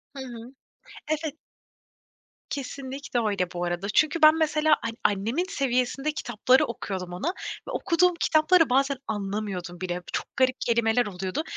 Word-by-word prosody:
Hı - - -7
hı. 240 0 -9 0.6
Evet. 310 -1 -2 1.1
Kesinlikle 275 -2 -4
öyle, 185 -4 -1
bu 175 -1 -4
arada. 175 +3 -2
Çünkü 310 +8 +2
ben, 310 +1 +9
mesela, 310 0 +3
hani, 230 0 -4
annemin 225 - +1
seviyesinde 270 +2 0
kitapları 250 -2 +2
okuyordum 185 -6 -5
ona 180 - -3 0.4
ve - - -4
okuduğum 360 +1 +2
kitapları 315 0 +4
bazen 275 +1 +2
anlamıyordum 195 -4 -4
bile. 180 -1 -3
Çok - - -1
garip 260 0 +3
kelimeler 235 0 +2
oluyordu 190 - -3
245 Hz, 135 wpm, -26 LUFS, 200-295 Hz, 1.1 s, ben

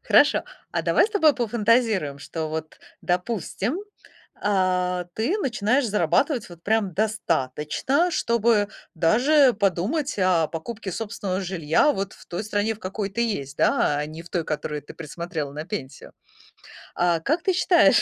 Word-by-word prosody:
Хорошо, - - +4 0.3
а - - 0
давай - - +4
с - - -12
тобой 320 -8 +4
пофантазируем, 225 - +1
что 160 +2 -5
вот, 155 0 -5 0.2
допустим, 195 - -1 0.7
а, 180 -2 +1
ты 255 - 0
начинаешь 250 - +1
зарабатывать 215 - +1
вот 170 -1 -13
прям 215 -3 +1
достаточно, 200 - 0
чтобы 235 -7 +2 0.3
даже 250 - +4
подумать 210 - -1
о 180 -4 +3
покупке 205 +5 -6
собственного 200 -2 -3
жилья 180 - +2
вот 195 -3 -3
в - - -16
той 175 +3 -4
стране, 210 +1 -1
в 215 - -17
какой 195 +1 -3
ты 225 +5 -3
есть, 150 - -2
да, 145 - +2
а 150 - -2
не 155 +2 -9
в 170 - -15
той, 175 - 0
которую 150 -1 -3
ты - - -12
присмотрела 160 -2 -5
на 150 +2 -5
пенсию. 155 -7 -7 0.8
А 175 -2 +2
как 315 - 0
ты 380 - +2
считаешь, 360 -1 +5
195 Hz, 150 wpm, -24 LUFS, 165-235 Hz, 0.8 s, считаешь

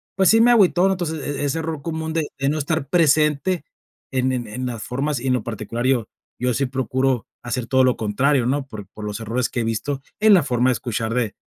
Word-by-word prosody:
pues, 190 -2 +4
sí 225 +1 +6
me 240 - +6
agüitó, 195 -4 +4
entonces, 170 -4 -2
e 145 0 -4
e - - +1
ese 145 +3 -1
error 160 -2 -4
común 160 -1 -3
de 160 -2 0
de 135 0 +1
no 150 - 0
estar 145 -1 -2
presente 155 +1 +2 0.5
en 130 -1 +1
en 120 -2 -3
en 125 +5 -5
las 120 -3 -5
formas, 140 +2 -2
y 130 - -5
en 130 - +3
lo 120 - -2
particular 115 +2 -4
yo 125 -4 +1 0.3
yo 125 0 +1
sí 135 +4 0
procuro 130 -1 0 0.2
hacer 120 0 -3
todo 130 +2 +3
lo 125 - +2
contrario, 125 +5 +1
¿no?, 135 +1 -1
por 110 -5 -8
por 105 - -7
los 105 0 -4
errores 115 +3 -1
que 120 - -2
he - - -1
visto 130 +5 -2 0.2
en 215 0 +6
la 175 - +4
forma 125 -2 +1
de - - +3
escuchar 115 -2 -3
de, 115 -4 0
130 Hz, 240 wpm, -22 LUFS, 120-155 Hz, 0.5 s, sí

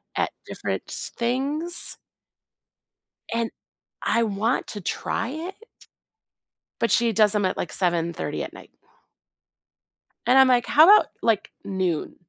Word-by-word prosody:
at - - 0
different - - -4
s - - -6
things 280 +8 0 1.4
and 230 0 -1 0.5
I 230 - +2
want 220 +3 -1
to 205 - -7
try 225 +6 -2
it, 330 +7 -6 1.2
but 230 -3 +1
she 230 +2 +3
does 215 0 +5
'em 205 -2 +1
at, 185 - -1
like, 175 - -4
7:30 170 -2 -1
at - - -8
night - - -14 1.5
and 260 - +4
I'm 265 - +7
like, 245 -2 +3
"How 305 - +6
about, 415 +4 +7
like, 225 -3 +1
noon?" 185 -5 -2
230 Hz, 125 wpm, -24 LUFS, 195-265 Hz, 1.5 s, I'm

